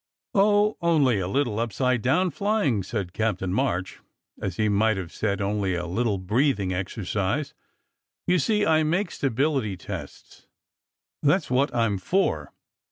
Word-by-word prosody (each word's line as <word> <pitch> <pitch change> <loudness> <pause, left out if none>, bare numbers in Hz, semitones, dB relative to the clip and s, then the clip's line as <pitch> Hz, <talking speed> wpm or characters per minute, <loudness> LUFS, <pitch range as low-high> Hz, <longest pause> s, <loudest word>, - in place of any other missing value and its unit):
"Oh, 205 +1 +3
only 145 -10 +3
a 90 - -2
little 115 0 0
upside 120 +2 0
down 175 - +2
flying," 200 - +1
said 95 -2 -4
Captain 95 -4 -1
March, 95 -7 -1 0.4
as 95 -3 -3
he 110 - +2
might 105 +1 +2
have 90 -3 -6
said 100 -2 -1
"only 100 -2 0
a 85 0 -3
little 100 +4 0
breathing 100 0 +1
exercise." 100 +8 -2 0.7
"You 180 0 +3
see, 210 +1 +1
I 160 -1 +4
make 170 +5 0
stability 135 -5 0
tests. - - -9 0.7
That 145 - +4
s - - -12
what 135 +3 +2
I 115 -1 +3
m 100 -3 -1
for. 190 - 0
115 Hz, 150 wpm, -25 LUFS, 100-150 Hz, 0.7 s, I